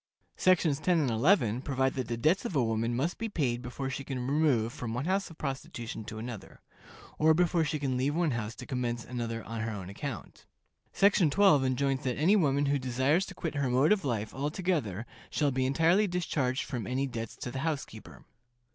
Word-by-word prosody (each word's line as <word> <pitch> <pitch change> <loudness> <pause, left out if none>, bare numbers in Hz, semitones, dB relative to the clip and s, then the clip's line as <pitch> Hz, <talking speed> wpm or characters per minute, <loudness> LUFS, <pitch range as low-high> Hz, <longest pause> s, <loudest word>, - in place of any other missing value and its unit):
Sections 165 -6 +3
10 170 +2 +2
and 140 -6 +1
11 120 - +3
provide 135 -1 0
that 130 -3 -3
the 120 - -2
debts 155 +11 +2
of 235 -9 -4
a 135 - +3
woman 115 +1 0
must 155 +9 -1
be 225 0 -2
paid 125 - -1
before 130 +2 -5
she 135 - -4
can 130 -3 -4
remove 135 -5 +2
from 115 -2 -5
one 125 +4 -2
house 190 +2 0
of 165 - -13
prostitution 120 -5 -5
to 110 0 -7
another, 115 -1 -8 0.6
or 160 +1 +5
before 170 -1 +2
she 150 0 -1
can 135 -3 -1
leave 140 +4 0
one 170 -3 +1
house 115 -2 -3
to 125 - -9
commence 120 -3 -2
another 115 -2 -4
on 115 0 -5
her 115 - -2
own 100 -4 -6
account. 120 +2 -7 0.4
Section 195 -4 +4
12 155 -4 +5
enjoins 130 +1 0
that 125 -2 -1
any 175 +8 +4
woman 145 -6 +2
who 140 0 +1
desires 130 +8 +1
to 195 - -9
quit 165 -3 -3
her 140 -3 0
mode 130 +7 +3
of 210 -4 +3
life 110 -6 -2
altogether 145 - -2 0.2
shall 145 -2 +1
be 130 0 0
entirely 170 +9 +3
discharged 155 -6 -1
from 120 -9 -5
any 130 +2 0
debts 115 -4 -5
to 120 - -6
the 130 - -4
housekeeper. 140 -7 -5
135 Hz, 205 wpm, -30 LUFS, 120-160 Hz, 0.6 s, or